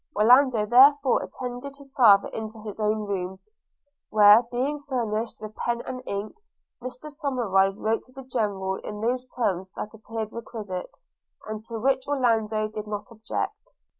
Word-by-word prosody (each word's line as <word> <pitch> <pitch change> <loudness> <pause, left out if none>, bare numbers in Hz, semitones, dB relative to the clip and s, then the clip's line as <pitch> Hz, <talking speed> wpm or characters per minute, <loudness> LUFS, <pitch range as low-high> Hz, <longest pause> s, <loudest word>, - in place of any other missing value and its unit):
Orlando 240 +1 +5
therefore 270 +4 +6
attended 255 +3 -6
his 275 -1 -15
father 210 -7 +6
into 220 0 -6
his 215 -1 -7
own 215 0 0
room; 190 -2 -3 0.7
where 210 +1 +8
being 255 +5 -3
furnished 230 -3 -2
with 215 0 -8
pen 235 +2 -2
and 255 -1 -5
ink, 200 +2 -4 0.5
Mr 255 +4 -8
Somerive 235 - +1
wrote 220 +1 0
to 255 - -21
the 270 +1 -10
General 200 -6 -2
in 210 - -7
those 250 +3 -2
terms 190 -6 -1
that 210 - -6
appeared 220 0 -6
requisite, 210 -6 -6 0.5
and 215 0 -5
to 230 -1 -5
which 265 +3 +1
Orlando 225 -6 +1
did 215 0 -7
not 210 +2 -5
object. 230 - -5
225 Hz, 150 wpm, -26 LUFS, 210-255 Hz, 0.7 s, where